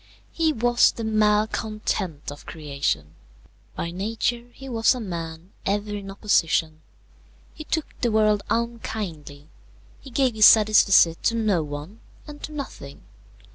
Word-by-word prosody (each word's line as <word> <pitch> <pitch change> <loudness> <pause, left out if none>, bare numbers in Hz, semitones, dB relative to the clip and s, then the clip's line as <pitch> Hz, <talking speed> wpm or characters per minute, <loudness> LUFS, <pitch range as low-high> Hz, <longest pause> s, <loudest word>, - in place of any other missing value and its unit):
He 325 -1 +1
was 240 -2 +3
the 230 - -7
malcontent 215 -6 0
of 145 - -12
creation. 140 - -3 0.6
By 170 - -4
nature 225 +5 -2
he 270 +2 -12
was 230 0 +2
a - - -5
man 170 -3 -6
ever 205 +1 -1
in 200 -1 -7
opposition. 165 -5 +1 0.7
He 310 - -9
took 320 -1 -1 0.2
the 240 - +2
world 215 -1 +3
unkindly; 190 -11 -4 0.5
he 275 - -12
gave 260 -1 +1
his 215 -1 +8
satisfecit 205 -6 +5
to 230 - +2
no 215 -6 +1
one 150 +8 -7 0.3
and 295 -1 -11
to - - -7
nothing. 270 - -8
210 Hz, 135 wpm, -24 LUFS, 165-230 Hz, 0.7 s, his